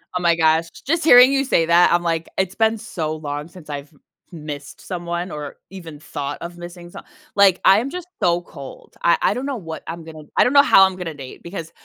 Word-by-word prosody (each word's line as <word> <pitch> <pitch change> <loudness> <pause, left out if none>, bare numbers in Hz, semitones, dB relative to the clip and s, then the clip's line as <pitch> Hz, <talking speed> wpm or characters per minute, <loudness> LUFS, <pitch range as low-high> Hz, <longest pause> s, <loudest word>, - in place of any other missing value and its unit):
Oh 180 - -1
my 170 -1 +3
gosh, 160 0 +2
j - - -16
j 285 - +1
just 335 - 0
hearing 250 -3 +8
you 275 0 +2
say 170 -11 +2
that, 170 +2 +4
I'm 175 0 +2
like, 165 -1 -1
it's 190 0 -1
been 225 0 +2
so 160 -6 -4
long 145 -1 -5
since 170 -3 -15
I've 145 0 -7
m 145 - -25 0.5
missed 145 -2 -8
someone 175 0 -5
or 150 -1 -7
even 170 -6 -10
thought 145 -2 -5
of 175 0 -8
missing 175 0 -10
some - - -11 0.3
like 195 -2 +5
I'm 215 +8 +4
just 360 +3 -7
so 175 0 +2
cold. 140 -6 -12
I 170 - +3
I - - +2
don't 250 +5 -4
know 280 -1 -3
what 165 -8 -8
I'm 165 0 -6
gonna 160 -1 -11
I - - +6
don't 245 - +1
know 280 0 +7
how 195 - +6
I'm 190 -1 -2
gonna 175 -3 -5
date, 135 -3 -11
because 170 -2 -7
170 Hz, 240 wpm, -20 LUFS, 160-195 Hz, 0.5 s, hearing